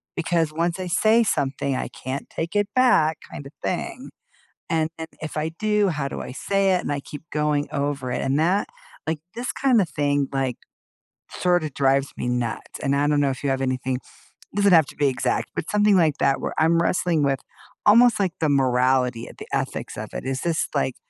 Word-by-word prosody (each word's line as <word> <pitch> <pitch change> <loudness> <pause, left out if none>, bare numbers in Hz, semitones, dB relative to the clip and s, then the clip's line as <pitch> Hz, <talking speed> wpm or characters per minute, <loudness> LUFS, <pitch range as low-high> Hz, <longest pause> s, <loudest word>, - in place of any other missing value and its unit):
Because 165 -2 0
once 170 +3 -1
I 185 - -3
say 220 +6 +4
something, 140 -8 -1
I - - -2
can't 130 +2 -6
take 165 +5 -4
it 205 -1 +2
back, 200 - +4
kinda 140 0 -8
thing, 255 +8 -3 0.6
and 160 -1 +1
and 160 0 -5
if 155 - -6
I 155 +1 -1
do, 210 +3 +1
how 150 -5 -2
do - - -6
I - - -6
say 195 +7 +1
it?" 180 - +1
And - - -2
I 145 - -2
keep 145 +1 -9
going 150 -1 0
over 140 -2 -2
it, - - -2
and 135 +2 +1
that 185 +6 +2 0.4
like, 160 -1 -1
this 240 +2 -3
kinda 245 -8 +3
thing, 145 -3 0
like, 135 -3 -1 0.7
sorta 175 -4 +1
drives 135 0 +1
me - - -3
nuts, 125 -2 -3
and 140 +1 +1
I 145 +1 +2
don't 145 0 +2
know 140 -1 +2
if 130 +1 -6
you 140 - +1
have 135 0 0
anything 130 0 -1 0.6
doesn't 200 -1 +4
have 160 -4 +7
to - - -12
be 145 - +2
exact, 130 - -1
but - - -4
something 210 0 +4
like 160 -5 +3
that 135 0 +2
where - - -3
I'm 165 +1 +4
wrestling 170 -3 +1
with 135 -1 +2 0.5
almost 235 +3 +6
like 190 -4 +1
the 160 - +2
morality 125 -3 +2
or - - -11
the - - -8
ethics - - -3
of - - -6
it. - - -5
"Is 130 0 -2
this, 170 -2 0
like, 135 -3 0
150 Hz, 205 wpm, -23 LUFS, 135-180 Hz, 0.7 s, have